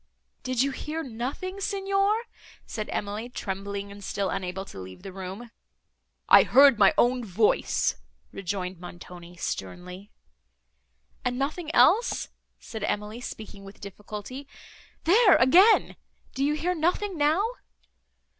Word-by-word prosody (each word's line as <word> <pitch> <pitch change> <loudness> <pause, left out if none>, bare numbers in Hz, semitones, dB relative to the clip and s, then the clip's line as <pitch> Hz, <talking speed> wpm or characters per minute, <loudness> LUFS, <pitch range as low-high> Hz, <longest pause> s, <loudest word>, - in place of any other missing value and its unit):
"Did 255 -1 0
you 275 - 0
hear 310 +4 -5
nothing, 270 - -5
Signor?" 395 +2 +1 0.4
said 215 -2 -5
Emily, 210 +4 -4
trembling, 200 -2 -5
and 200 0 -11
still 195 0 -2
unable 190 +1 -4
to 95 - -10
leave 95 - -10
the 195 -2 -8
room. 195 +5 -8 0.8
"I - - +9
heard 275 -4 +6
my 195 -2 +7
own 245 +1 +3
voice," 210 +1 +1 0.3
rejoined 185 -2 -4
Montoni, 175 0 -11
sternly. 180 - -6 1.1
"And 250 -1 -1
nothing 305 +5 -3
else?" 455 +6 +4 0.3
said 220 -2 -8
Emily, 210 +3 -3
speaking 215 -4 -8
with 195 0 -13
difficulty.—"There 255 - -1
again! 365 - +5 0.4
Do 270 - -1
you 295 +2 +2
hear 350 +4 -1
nothing 360 +4 0
now?" 310 +6 +2
225 Hz, 120 wpm, -26 LUFS, 195-305 Hz, 1.1 s, I